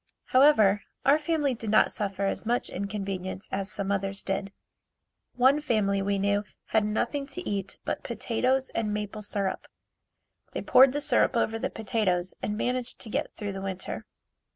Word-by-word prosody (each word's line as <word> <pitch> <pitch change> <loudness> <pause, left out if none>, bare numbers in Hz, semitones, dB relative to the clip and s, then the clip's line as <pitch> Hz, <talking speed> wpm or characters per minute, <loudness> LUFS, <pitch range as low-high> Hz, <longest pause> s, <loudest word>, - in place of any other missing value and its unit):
However, 220 -7 +5 0.2
our 285 +3 +5
family 300 -3 +1
did 225 -2 -5
not 215 - +5
suffer 200 -1 -2
as 195 - -1
much 240 +2 0
inconvenience 195 -1 -4
as 195 0 -2
some 200 0 -2
others 195 0 -2
did. 195 0 -2 0.8
One 265 +4 +4
family 205 -7 +1
we 200 0 0
knew 200 +1 +1 0.3
had 220 -1 +3
nothing 240 +6 -1
to 360 +5 -7
eat 200 -2 -3
but - - -2
potatoes 260 +3 0
and 220 -2 -1
maple 210 0 -4
syrup. 200 -2 -2 0.9
They - - -3
poured 260 0 +7
the 290 - -1
syrup 270 - +3
over 225 -1 +1
the - - -1
potatoes 190 -5 -1
and 210 - -2
managed 250 +1 -1
to 220 - -6
get - - -1
through 205 -2 -4
the 195 - -5
winter. 190 -1 -5
210 Hz, 165 wpm, -28 LUFS, 195-250 Hz, 0.9 s, poured